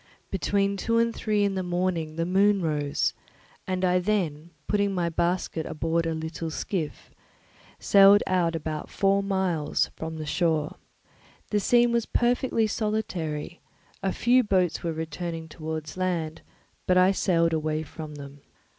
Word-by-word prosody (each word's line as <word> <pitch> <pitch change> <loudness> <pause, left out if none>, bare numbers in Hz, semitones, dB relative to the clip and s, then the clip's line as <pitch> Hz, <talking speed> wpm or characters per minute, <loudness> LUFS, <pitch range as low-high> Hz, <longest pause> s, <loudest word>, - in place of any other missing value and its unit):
Between 200 +1 0
two 230 +4 0
and 230 0 +2
three 210 -2 0
in 200 -1 +1
the 190 - -1
morning 175 -3 -1
the 165 +1 -1
moon 200 +3 +3
rose; 150 -3 0 0.5
and 185 0 0
I 180 0 +3
then, 175 -5 -1 0.2
putting 200 -1 +1
my 175 -2 0
basket 170 -1 -1
aboard 165 +1 -1
a 165 - -1
little 160 +1 -4
skiff, 160 0 -4 0.7
sailed 200 0 +6
out 175 -3 +1
about 155 -1 -4
four 195 0 +2
miles 190 -6 0
from 160 0 -6
the 155 - -5
shore. 155 -1 0 0.7
The 210 - +2
scene 240 +4 +4
was 235 -1 0
perfectly 240 -1 +1
solitary; 185 -8 -3 0.4
a 195 - 0
few 245 +5 +3
boats 185 -5 +1
were 170 - -2
returning 160 +1 -5
towards 155 -1 -6
land, 165 -4 -2 0.5
but 180 - +4
I 185 +1 +6
sailed 170 -4 +2
away 155 0 -1
from 155 0 -9
them. 140 0 -10
175 Hz, 145 wpm, -26 LUFS, 160-200 Hz, 0.7 s, sailed